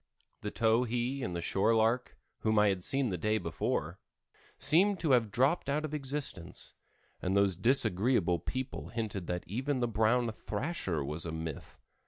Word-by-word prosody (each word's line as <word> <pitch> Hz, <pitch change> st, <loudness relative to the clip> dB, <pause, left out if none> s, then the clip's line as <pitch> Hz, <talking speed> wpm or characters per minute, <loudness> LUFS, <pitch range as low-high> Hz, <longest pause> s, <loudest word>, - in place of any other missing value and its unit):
The 105 Hz, -, -3 dB
towhee 120 Hz, +4 st, +1 dB
and 90 Hz, -7 st, -3 dB
the 85 Hz, -, -3 dB
shore 105 Hz, +6 st, +2 dB
lark 115 Hz, +3 st, +1 dB, 0.2 s
whom 110 Hz, -1 st, +1 dB
I 105 Hz, 0 st, +5 dB
had 95 Hz, -2 st, -1 dB
seen 135 Hz, +2 st, +2 dB
the 90 Hz, -3 st, -3 dB
day 110 Hz, +5 st, +1 dB
before, 85 Hz, -4 st, -2 dB, 0.6 s
seemed 185 Hz, +6 st, +3 dB
to 160 Hz, -4 st, +1 dB
have 120 Hz, -4 st, +4 dB
dropped 135 Hz, -, +1 dB
out 150 Hz, +2 st, 0 dB
of 155 Hz, -, -6 dB
existence, 135 Hz, -, -5 dB, 0.5 s
and 95 Hz, +2 st, +1 dB
those 100 Hz, -2 st, +3 dB
disagreeable 100 Hz, -3 st, +2 dB
people 130 Hz, -, -4 dB
hinted 105 Hz, -5 st, -4 dB
that 90 Hz, 0 st, -2 dB
even 130 Hz, +7 st, -2 dB
the 120 Hz, -, +1 dB
brown 115 Hz, +2 st, +2 dB
thrasher 105 Hz, -, -3 dB
was 75 Hz, +3 st, -3 dB
a -, -, -3 dB
myth. 80 Hz, -2 st, -6 dB
110 Hz, 165 wpm, -32 LUFS, 95-130 Hz, 0.6 s, I